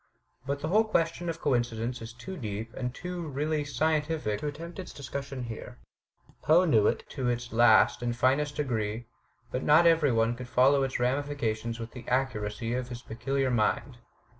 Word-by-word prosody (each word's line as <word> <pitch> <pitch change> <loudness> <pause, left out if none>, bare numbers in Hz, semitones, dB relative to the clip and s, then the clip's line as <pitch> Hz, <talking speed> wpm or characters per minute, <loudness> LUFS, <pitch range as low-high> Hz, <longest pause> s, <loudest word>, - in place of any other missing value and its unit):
But 140 0 -2
the 155 - -2
whole 215 +5 +4
question 170 -4 0
of 165 0 -4
coincidence 120 -3 -1
is 115 +1 -7
too 125 +12 -8
deep 110 - -5
and 125 -1 -3
too 175 +4 -5
really 150 +2 -1
scientific 150 -6 0
to 150 - -3
attempt 165 +5 -7
its 185 - -7
discussion 140 -1 -5
here. 115 -2 -7 0.6
Poe 165 +6 +5
knew 110 - +4
it - - -1
to 130 -3 -2
its 120 0 -3
last 115 0 +5
and 120 -1 -1
finest 140 +4 +2
degree, 115 -5 -2 0.5
but 125 - -2
not 155 +3 +5
every 165 -4 +5
one 115 0 +2
could 125 0 -8
follow 135 +3 +4
its 135 -2 -1
ramifications 125 -4 -1
with 115 0 -6
the 125 - -10
accuracy 115 -3 -1
of 125 0 -3
his 120 -1 -7
peculiar 135 +3 -1
mind. 120 +3 0
130 Hz, 175 wpm, -29 LUFS, 120-150 Hz, 0.6 s, Poe